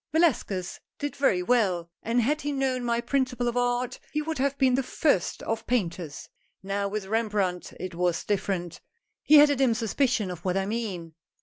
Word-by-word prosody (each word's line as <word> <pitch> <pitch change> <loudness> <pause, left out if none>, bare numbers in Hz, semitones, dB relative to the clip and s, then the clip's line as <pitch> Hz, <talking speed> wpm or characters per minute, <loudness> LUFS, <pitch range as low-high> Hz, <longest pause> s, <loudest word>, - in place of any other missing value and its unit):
"Velasquez 240 - +1 0.2
did 290 0 -4
very 190 -10 +2
well, 185 -7 +1
and 235 +1 +1
had 300 +6 +1
he 290 - -2
known 265 -2 0
my 235 -1 +1
principle 250 0 0
of 240 - -1
art, 245 +1 0
he 300 - -1
would 310 -1 -3
have 280 +1 0
been 260 -2 +3
the 265 - +3
first 255 - 0
of 225 0 -3
paint 200 -9 0
ers. 155 -4 -8 0.4
Now 200 +1 -1
with 205 0 -3
Rembrandt, 205 -4 -1
it 185 -1 -5
was 175 0 0
different. 190 -4 -2 0.4
He 305 - +5
had 295 0 +8
a - - +2
dim 255 -3 +2
suspicion 225 -2 0
of 175 -1 -8
what 185 0 0
I 195 - 0
mean." 195 -7 -4
230 Hz, 190 wpm, -27 LUFS, 190-260 Hz, 0.4 s, had